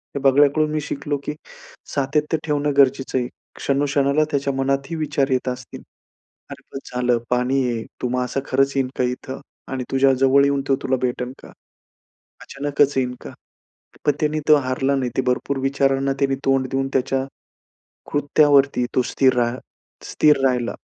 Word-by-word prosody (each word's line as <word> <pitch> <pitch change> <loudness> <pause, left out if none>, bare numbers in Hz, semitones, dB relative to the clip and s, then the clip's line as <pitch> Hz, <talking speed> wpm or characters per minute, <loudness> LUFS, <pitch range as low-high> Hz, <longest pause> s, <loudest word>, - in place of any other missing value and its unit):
हे 140 - -1
बगळ्याकडून 145 +3 +4
मी 155 -1 -1
शिकलो 145 0 -3
की 150 - -3 0.6
सातत्य 150 +3 0
ठेवणं 145 -1 0
गरजेचं 135 -1 +3
आहे. 125 - -1 0.3
क्षणो-क्षणाला 140 +1 +1
त्याच्या 140 -1 0
मनातही 135 +3 -1
विचार 150 -3 -1
येत 130 0 0
असतील. 125 0 -7 0.7
अरे - - -10
पण, 135 - -5 0.2
झालं 125 -1 +2
पाणी 125 +2 +1
आहे. 115 -1 -3 0.2
तो 125 - 0
मासा 125 +1 -1
खरंच 135 +1 +1
येईन 135 -2 +1
का 125 - +1
इथं 125 +2 -4 0.3
आणि 130 -1 -2
तुझ्या 135 0 +4
जवळ 135 +1 +4
येऊन 140 -1 +1
तो 135 - +3
तुला 130 0 +1
भेटेल 125 0 -2
का? - - -10 1.0
अचानकच 145 0 0
येईन 125 -1 0
का? - - -9 0.7
पण 145 - +5
त्याने 155 0 0
तो 155 - +8
हारला 135 0 0
नाही. 125 -2 -1
ते 130 - +2
भरपूर 130 +2 -1
विचारांना 135 0 +1
त्याने 135 -1 +2
तोंड 135 -1 +2
देऊन, 135 0 -1
त्याच्या 135 0 0 0.9
कृत्यावरती 145 -3 +3
तो 130 - +4
स्थिर 130 -2 +3
रा 120 0 +1 0.5
स्थिर 150 -2 +3
राहिला. 125 -2 0
135 Hz, 160 wpm, -21 LUFS, 130-140 Hz, 1.0 s, तो